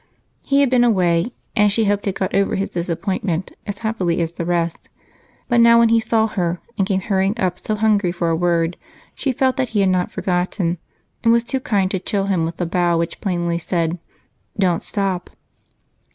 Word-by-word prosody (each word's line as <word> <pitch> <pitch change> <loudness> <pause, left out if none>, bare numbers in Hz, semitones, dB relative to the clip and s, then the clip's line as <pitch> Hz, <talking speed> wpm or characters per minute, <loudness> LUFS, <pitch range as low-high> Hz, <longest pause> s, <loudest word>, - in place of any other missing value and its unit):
He 280 0 +2
had 275 -3 +2
been 250 -1 +4
away, 185 -3 +2 0.2
and 210 -2 +4
she 220 +2 +2
hoped 205 0 0
had 195 -2 -1
gotten 195 0 +1
over 195 - -1
his 195 - -2
disappointment 175 +1 -2 0.2
as 205 -1 -4
happily 185 -7 0
as 165 -1 -1
the 170 0 -5
rest, 170 -1 -2 0.6
but 240 -1 +3
now 235 0 +7
when 235 -1 +5
he 230 0 +4
saw 225 0 +2
her, 180 -5 -2 0.2
and 195 - 0
came 190 -1 0
hurrying 195 +3 0
up 185 -3 0
so 215 - -2
hungry 210 -4 +2
for 170 -1 -1
a - - +2
word, 170 0 +1 0.4
she 275 - -1
felt 260 +1 +1
that 260 -3 0
he 215 - 0
had 195 - +3
not 180 -1 +1
forgotten 180 -1 -1 0.4
and 230 - +5
was 235 0 +3
too 265 +2 -2
kind 200 -6 0
to 190 - -1
chill 195 +1 -1
him 185 -5 +1
with 165 +1 -5
the 175 - -1
bow 175 0 +1
which 170 0 -3
plainly 175 -3 -1
says 165 -1 -1 0.7
"Don't 180 -4 +1
stop." 195 -3 -2
190 Hz, 200 wpm, -20 LUFS, 175-220 Hz, 0.7 s, now